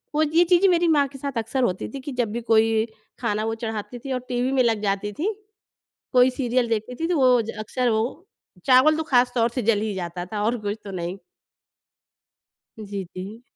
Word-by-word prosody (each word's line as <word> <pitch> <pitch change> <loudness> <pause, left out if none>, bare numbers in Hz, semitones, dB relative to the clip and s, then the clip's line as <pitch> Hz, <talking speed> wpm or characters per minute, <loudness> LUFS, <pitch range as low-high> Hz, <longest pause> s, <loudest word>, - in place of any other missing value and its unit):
वो 305 - +3
ये 325 +3 +4
चीज़ें 365 +2 +5
मेरी 345 -1 +3
माँ 290 -3 +4
के 270 - -12
साथ 275 -2 -5
अक्सर 230 +4 -1
होती 185 -6 -1
थी। 275 - -5
कि 285 - -6
जब 230 -4 +1
भी 235 - -3
कोई 225 0 +5 0.5
खाना 215 -3 -1
वो 225 - -1
चढ़ाती 225 +2 -4
थी 270 +3 -7
और 255 - -1
टीवी 250 +1 0
में 265 - +3
लग 225 -3 +1
जाती 200 0 -1
थी, 375 - -1 0.8
कोई 250 0 +6
सीरियल 250 -2 0
देखती 225 +2 -2
थी 330 - +1
तो - - +2
वो 250 -2 +5
ज 220 - -5
अक्सर 245 +2 0
वो 220 0 +2 0.6
चावल 265 +4 +6
तो 320 - -1
खास 245 0 +4
तौर 230 -1 +3
से 250 - 0
जल 205 - +1
ही 215 -1 -2
जाता 175 -1 -4
था 210 -1 -2
और 235 +3 +1
कुछ 205 +2 -2
तो 200 - -7
नहीं। 175 +3 -4 1.7
जी, 200 -1 -5
जी। 200 +5 -7
240 Hz, 215 wpm, -24 LUFS, 215-260 Hz, 1.7 s, कोई